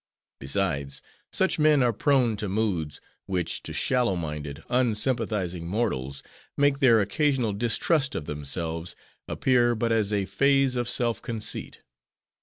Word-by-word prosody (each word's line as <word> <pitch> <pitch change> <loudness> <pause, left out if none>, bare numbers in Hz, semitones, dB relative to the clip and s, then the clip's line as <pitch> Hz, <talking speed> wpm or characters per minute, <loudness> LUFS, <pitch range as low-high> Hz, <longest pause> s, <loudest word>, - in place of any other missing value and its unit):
Besides, 70 -2 -2 0.3
such 190 -3 +1
men 150 -3 +5
are 120 -1 +2
prone 125 -2 +2
to 105 -1 -3
moods, 95 -8 -1 0.3
which 90 -3 -2
to - - -7
shallow 125 -7 +1
minded, 75 -3 -5
unsympathizing 110 -7 0
mortals, 85 - -2 0.3
make 145 -1 +3
their 115 -5 +5
occasional 125 +1 +1
distrust 120 +7 0
of 75 - -3
themselves, 80 +3 -4 0.3
appear 120 -2 +2
but 115 +1 -1
as 110 -2 +1
a 100 -2 0
phase 135 +6 +2
of 120 -1 -1
self 120 -2 +1
conceit. 115 -3 -3
110 Hz, 130 wpm, -26 LUFS, 90-125 Hz, 0.3 s, men